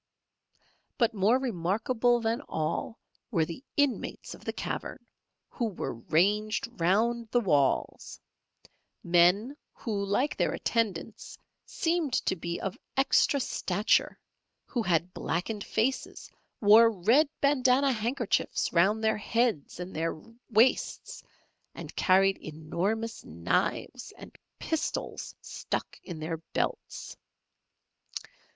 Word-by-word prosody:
But 235 Hz, -3 st, +2 dB
more 210 Hz, +4 st, +3 dB
remarkable 240 Hz, +2 st, +1 dB
than 230 Hz, +3 st, 0 dB
all 155 Hz, +8 st, -2 dB, 0.3 s
were 170 Hz, -9 st, +1 dB
the 170 Hz, -, -8 dB
inmates 285 Hz, -4 st, -1 dB
of -, -, -13 dB
the -, -, -2 dB
cavern, -, -, -5 dB, 0.4 s
who 240 Hz, -, -3 dB
were 210 Hz, -5 st, -3 dB
ranged 205 Hz, -, +1 dB
round 230 Hz, +7 st, +2 dB
the 245 Hz, -, +3 dB
walls; 145 Hz, -, 0 dB, 0.8 s
men, 180 Hz, +9 st, +4 dB, 0.2 s
who 205 Hz, -4 st, -3 dB
like 225 Hz, +9 st, 0 dB
their -, -, 0 dB
attendants, 220 Hz, -3 st, -2 dB, 0.3 s
seemed 330 Hz, -5 st, -1 dB
to -, -, +1 dB
be 170 Hz, 0 st, -4 dB
of 195 Hz, -, -4 dB, 0.2 s
extra 275 Hz, +1 st, +3 dB
stature; 205 Hz, -4 st, +1 dB, 0.5 s
who 245 Hz, -, -2 dB
had 175 Hz, -3 st, 0 dB
blackened 200 Hz, +5 st, -3 dB
faces, 245 Hz, +5 st, -2 dB, 0.3 s
wore 220 Hz, +2 st, +8 dB
red 230 Hz, -, +3 dB
bandanna 275 Hz, -1 st, +3 dB
handkerchiefs 235 Hz, 0 st, -1 dB
round 200 Hz, +6 st, +3 dB
their 220 Hz, 0 st, +2 dB
heads 225 Hz, -, -1 dB
and 180 Hz, +1 st, -6 dB
their 165 Hz, 0 st, -2 dB, 0.3 s
waists, 230 Hz, +3 st, +2 dB, 0.5 s
and -, -, -9 dB
carried 195 Hz, +1 st, +3 dB
enormous 175 Hz, +9 st, -3 dB
knives -, -, -2 dB
and -, -, -12 dB, 0.2 s
pistols 320 Hz, -2 st, -3 dB
stuck -, -, -5 dB
in 175 Hz, -4 st, -7 dB
their 165 Hz, +1 st, -3 dB, 0.2 s
belts. -, -, -3 dB
215 Hz, 110 wpm, -29 LUFS, 180-240 Hz, 0.8 s, wore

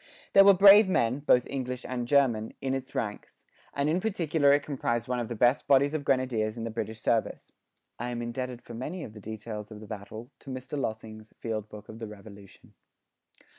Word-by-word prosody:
There 195 Hz, -, +9 dB
were 200 Hz, 0 st, +7 dB
brave 200 Hz, +2 st, +8 dB
men, 125 Hz, -6 st, +1 dB
both 125 Hz, -4 st, +3 dB
English 125 Hz, -2 st, -4 dB
and 120 Hz, -2 st, -3 dB
German, 120 Hz, -6 st, +2 dB
in 135 Hz, -1 st, -2 dB
its 135 Hz, -1 st, -5 dB
ranks; 105 Hz, -2 st, -5 dB, 0.3 s
and 140 Hz, +1 st, -1 dB
in 165 Hz, +4 st, +1 dB
particular 160 Hz, -8 st, +2 dB
it 145 Hz, +1 st, +3 dB
comprised 120 Hz, -5 st, -2 dB
one 125 Hz, 0 st, -1 dB
of 120 Hz, -, -3 dB
the 120 Hz, -, -5 dB
best 120 Hz, +4 st, +2 dB
bodies 140 Hz, +1 st, +4 dB
of 155 Hz, -2 st, -2 dB
grenadiers 125 Hz, -5 st, 0 dB
in 115 Hz, -, -5 dB
the 115 Hz, -, -4 dB
British 110 Hz, 0 st, -5 dB
service. 115 Hz, 0 st, -1 dB, 0.5 s
[I 120 Hz, +1 st, -3 dB
am 120 Hz, -1 st, -4 dB
indebted 125 Hz, +1 st, -5 dB
for 120 Hz, -, -10 dB
many 150 Hz, +10 st, -5 dB
of 105 Hz, -, -9 dB
the 105 Hz, -, -11 dB
details 110 Hz, 0 st, -7 dB
of 110 Hz, -2 st, -10 dB
the 110 Hz, -, -10 dB
battle, 110 Hz, +2 st, -8 dB
to -, -, -13 dB
Mr 130 Hz, +2 st, -6 dB
Lossing's 110 Hz, -4 st, -5 dB
"Field 110 Hz, -2 st, -4 dB
book 105 Hz, 0 st, -11 dB
of 110 Hz, -, -10 dB
the 115 Hz, -, -5 dB
Revolution." 100 Hz, -1 st, -14 dB
120 Hz, 205 wpm, -28 LUFS, 110-140 Hz, 0.5 s, There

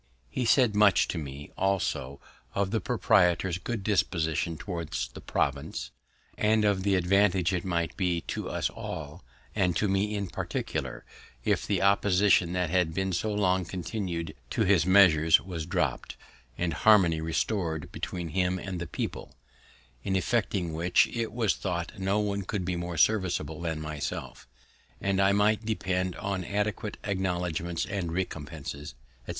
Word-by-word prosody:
He 125 Hz, -, -1 dB
said 120 Hz, -2 st, +4 dB
much 100 Hz, -5 st, +5 dB
to 85 Hz, -, -2 dB
me, 70 Hz, -1 st, -8 dB
also, 85 Hz, -8 st, -1 dB, 0.4 s
of 100 Hz, -1 st, 0 dB
the 110 Hz, -1 st, 0 dB
proprietor's 95 Hz, -5 st, +2 dB
good 110 Hz, +1 st, -4 dB
disposition 85 Hz, -5 st, 0 dB
towards 85 Hz, -5 st, -4 dB
the -, -, -11 dB
province, -, -, -2 dB, 0.5 s
and 110 Hz, 0 st, +3 dB
of 100 Hz, -2 st, +2 dB
the 100 Hz, 0 st, +2 dB
advantage 95 Hz, 0 st, +3 dB
it 90 Hz, -1 st, -1 dB
might 85 Hz, -3 st, -1 dB
be 90 Hz, -3 st, 0 dB
to -, -, -4 dB
us -, -, -1 dB
all, -, -, -7 dB, 0.3 s
and 90 Hz, -4 st, +1 dB
to 105 Hz, -, +1 dB
me 100 Hz, +2 st, 0 dB
in 100 Hz, -1 st, -1 dB
particular, 90 Hz, -, -4 dB, 0.4 s
if -, -, +1 dB
the -, -, +1 dB
opposition 100 Hz, -2 st, +4 dB
that 90 Hz, -3 st, 0 dB
had 90 Hz, -3 st, +1 dB
been 95 Hz, 0 st, -1 dB
so 105 Hz, +5 st, -1 dB
long 95 Hz, -3 st, +2 dB
continu'd 85 Hz, -2 st, -4 dB, 0.2 s
to -, -, +1 dB
his 90 Hz, -3 st, +3 dB
measures 85 Hz, -5 st, +6 dB
was 85 Hz, -4 st, -6 dB
dropt, -, -, -1 dB, 0.4 s
and 85 Hz, -2 st, -1 dB
harmony 90 Hz, -7 st, +5 dB
restor'd 80 Hz, -1 st, -1 dB
between 85 Hz, -2 st, -4 dB
him 90 Hz, +2 st, +1 dB
and 95 Hz, -1 st, -5 dB
the 85 Hz, -, -4 dB
people; -, -, -5 dB, 0.7 s
in 95 Hz, -, -1 dB
effecting 95 Hz, -4 st, 0 dB
which, 85 Hz, +3 st, +3 dB
it 115 Hz, -1 st, -2 dB
was 115 Hz, -4 st, +1 dB
thought 90 Hz, +2 st, -4 dB
no 95 Hz, +2 st, +1 dB
one 100 Hz, -1 st, -1 dB
could 95 Hz, 0 st, -3 dB
be 90 Hz, 0 st, -1 dB
more 85 Hz, -1 st, -4 dB
serviceable 85 Hz, -4 st, +1 dB
than 80 Hz, -2 st, -2 dB
myself; 75 Hz, -2 st, -5 dB, 0.5 s
and 100 Hz, 0 st, +1 dB
I 95 Hz, 0 st, +5 dB
might 105 Hz, +2 st, +3 dB
depend 95 Hz, -4 st, -1 dB
on 95 Hz, -2 st, -3 dB
adequate 105 Hz, +2 st, -2 dB
acknowledgments 90 Hz, -3 st, -1 dB
and 95 Hz, -4 st, -3 dB
recompenses, 75 Hz, -6 st, -5 dB, 0.3 s
etc. -, -, -11 dB
95 Hz, 155 wpm, -28 LUFS, 85-100 Hz, 0.7 s, measures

